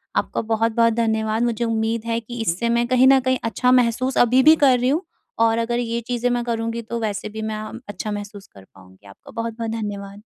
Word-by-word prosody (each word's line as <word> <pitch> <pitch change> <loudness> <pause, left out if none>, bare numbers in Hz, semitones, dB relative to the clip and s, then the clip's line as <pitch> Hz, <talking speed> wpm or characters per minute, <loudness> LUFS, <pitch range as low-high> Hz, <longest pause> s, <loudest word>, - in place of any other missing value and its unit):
आपका - - -1
बहुत-बहुत 225 +1 +1
धन्यवाद 220 0 0
मुझे 235 -1 0
उम्मीद 225 0 -1
है 230 0 -1
कि 240 +1 -9
इससे 225 +3 -1
मैं 235 0 +1
कहीं 255 +1 +4
न 270 0 +6
कहीं 260 0 0
अच्छा 230 +3 +1
महसूस 250 +1 +2
अभी 245 +2 +5
भी 310 +3 +8
कर 275 -5 +4
रही 250 +1 +1
हूँ, 305 +5 +1 0.4
और 225 0 +3
अगर 235 +1 -1
ये 235 -1 -2
चीज़ें 245 0 0
मैं 240 -1 0
करूँगी 230 0 -2
तो 235 +1 -5
वैसे 210 -1 -3
भी 220 +1 -7
मैं 220 0 -3
अ, 215 0 -7 0.2
अच्छा 205 +2 -5
महसूस 205 -1 -7
कर 95 - -17
पाऊँगी 95 +1 -19
आपका 100 - -15
बहुत-बहुत 230 0 -4
धन्यवाद। 205 -2 -6
230 Hz, 215 wpm, -21 LUFS, 215-240 Hz, 0.4 s, भी